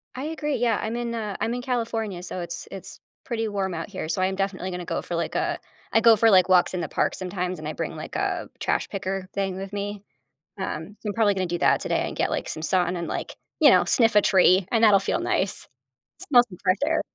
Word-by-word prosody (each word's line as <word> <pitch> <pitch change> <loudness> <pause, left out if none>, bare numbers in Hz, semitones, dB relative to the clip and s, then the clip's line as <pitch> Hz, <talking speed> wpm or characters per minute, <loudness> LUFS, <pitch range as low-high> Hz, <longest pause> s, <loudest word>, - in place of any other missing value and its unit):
I 260 +3 -4
agree, 305 -2 -2
yeah, 235 -1 +1
I'm 220 +2 -3
in, 240 -1 -3
uh 215 -4 -4
I'm 230 - -1
in 245 - -3
California, 225 -7 -2
so 185 - -5
it's 170 0 -6
it's 195 - -9 0.3
pretty 225 -3 -2
warm 195 -3 -2
out 165 0 -5
here. - - -5
So 185 - -1
I 185 - +3
am 190 - -2
definitely 190 -1 -2
gonna 180 -1 -5
go 165 - -2
for, 175 - -5
like 170 - -2
a - - 0 0.3
I 225 - +5
go 230 -1 +7
for, 225 +2 +5
like, 185 -3 +5
walks 180 0 +4
in 180 - -2
the - - -4
park - - 0
sometimes 180 -2 -3
and 155 - -6
I 155 - -3
bring - - -4
like - - -8
a - - -2
trash - - -1
picker 190 -1 -4
thing 195 -2 -1
with 195 +1 -6
me. 205 0 -4 0.6
Um, 190 +2 -5
I'm 205 - 0
probably 215 -3 +3
gonna 185 -1 -1
do 175 0 -2
that - - +3
today - - 0
and - - -6
get - - 0
like - - -2
some 155 - -5
sun 180 +1 +1
and 170 - -4
like, - - -4 0.2
you - - +8
know, - - +5
sniff 230 -4 +3
a 210 - +7
tree 185 -1 +4
and 230 -1 +2
that'll 205 -2 +7
feel - - -1
nice. 190 - -1 0.5
Smell 265 -10 +5
some 180 - -11
fresh 185 +2 +3
air. 320 0 +1
195 Hz, 250 wpm, -25 LUFS, 180-225 Hz, 0.6 s, you